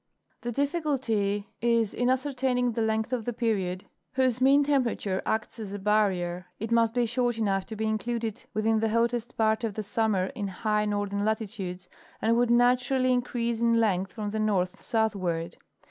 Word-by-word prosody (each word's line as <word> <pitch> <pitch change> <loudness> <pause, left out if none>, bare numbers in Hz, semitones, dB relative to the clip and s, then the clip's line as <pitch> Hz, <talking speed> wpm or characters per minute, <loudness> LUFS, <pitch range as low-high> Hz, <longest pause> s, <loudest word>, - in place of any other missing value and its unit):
The 240 - -3
difficulty 250 - 0
is 230 -2 +2
in 245 +1 +1
ascertaining 255 -2 +1
the 230 0 -2
length 220 +2 0
of 240 -3 -1
the 240 - -3
period 195 -6 -1 0.3
whose 255 -1 +1
mean 275 +2 +6
temperature 245 -9 0
acts 220 +1 -2
asa 205 -2 -5
barrier. 190 -4 +1
It 225 +2 -4
must 230 0 +3
be 245 -1 +3
short 240 0 0
enough 195 -4 0
to 220 - -6
be 220 +1 -2
included 225 0 -2
within 220 +1 +2
the 225 0 +1
hottest 235 +1 0
part 220 +1 +2
of 220 -3 -2
the 215 - -3
summer 205 -2 0
in 210 -6 -3
high 210 +2 0
northern 205 -1 -1
latitudes, 200 -4 -3 0.3
and 230 +1 +2
would 240 0 +2
naturally 250 +2 +3
increase 235 -2 -1
in 230 -1 +3
length 190 -4 +1
from 210 -1 -4
the 220 - -2
north 195 -3 0
southward. 185 -7 -1
220 Hz, 170 wpm, -27 LUFS, 205-240 Hz, 0.3 s, mean